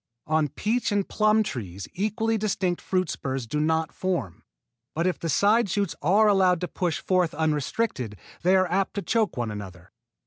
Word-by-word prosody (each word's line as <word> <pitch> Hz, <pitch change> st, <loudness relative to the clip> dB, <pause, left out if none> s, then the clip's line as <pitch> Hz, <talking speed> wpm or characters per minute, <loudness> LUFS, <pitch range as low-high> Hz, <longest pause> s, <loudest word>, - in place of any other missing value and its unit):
On 155 Hz, -1 st, +2 dB
peach 225 Hz, -, -1 dB
and 205 Hz, -1 st, 0 dB
plum 215 Hz, 0 st, +3 dB
trees 100 Hz, -, -6 dB
equally 220 Hz, +3 st, 0 dB
distinct 195 Hz, -4 st, -1 dB
fruit 185 Hz, -1 st, 0 dB
spurs 135 Hz, -4 st, -3 dB
do 150 Hz, +6 st, -2 dB
not 160 Hz, +1 st, +1 dB
form; 175 Hz, -, -3 dB, 0.5 s
but 165 Hz, +2 st, 0 dB
if 185 Hz, -4 st, 0 dB
the 165 Hz, -, -3 dB
side 205 Hz, +6 st, +3 dB
shoots 200 Hz, -1 st, 0 dB
are 200 Hz, +8 st, +4 dB
allowed 190 Hz, -3 st, +4 dB
to 180 Hz, -, -1 dB
push 175 Hz, -3 st, -2 dB
forth 180 Hz, -4 st, +1 dB
unrestricted 150 Hz, -, -1 dB, 0.2 s
they 185 Hz, +3 st, +4 dB
are 185 Hz, 0 st, +4 dB
apt 195 Hz, +2 st, 0 dB
to 200 Hz, -, -2 dB
choke 220 Hz, -, 0 dB
one 120 Hz, -3 st, -2 dB
another. 95 Hz, -4 st, -9 dB
180 Hz, 175 wpm, -26 LUFS, 150-205 Hz, 0.5 s, are